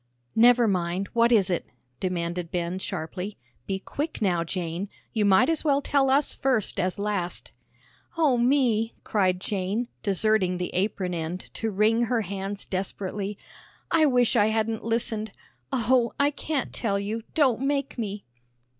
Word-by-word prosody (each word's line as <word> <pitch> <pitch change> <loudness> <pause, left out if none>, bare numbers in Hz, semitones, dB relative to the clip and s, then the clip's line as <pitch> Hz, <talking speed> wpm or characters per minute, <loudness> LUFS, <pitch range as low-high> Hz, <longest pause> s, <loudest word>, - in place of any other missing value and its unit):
"Never 240 +1 +6
mind, 180 0 -1
what 235 0 +4
is 200 -5 +4
it?" 175 - 0 0.4
demanded 175 -2 -2
Ben, 175 0 -2
sharply. 185 +2 -5 0.3
"Be 195 - -1
quick 295 +10 -4
now, 180 -5 +1
Jane; 175 +2 -3 0.2
you 215 -3 +1
might 200 +5 +5
as 325 -1 +1
well 285 -3 +3
tell 275 -1 +2
us 275 +2 +3
first 255 -6 0
as 185 0 0
last." 200 -4 -3 0.7
"O 300 -6 +4
me!" 240 -3 +2
cried 185 -4 +1
Jane, 200 +5 -2
deserting 200 -2 +2
the 180 0 -4
apron 185 -1 -1
end 170 +2 -5
to 225 - -2
wring 220 +3 +3
her 235 -1 +1
hands 195 0 -4
desperately, 195 +1 -3 0.5
"I 320 -2 +5
wish 245 -2 +3
I 210 -2 +5
hadn't 220 0 0
listened. 220 -2 -1 0.4
Oh, 245 -1 +2
I 285 +1 +4
can't 295 -1 -3
tell 200 -4 0
you, 210 +3 -3
don't 260 -6 +3
make 275 -1 -1
me!" 205 -2 -4
210 Hz, 150 wpm, -26 LUFS, 185-240 Hz, 0.7 s, Never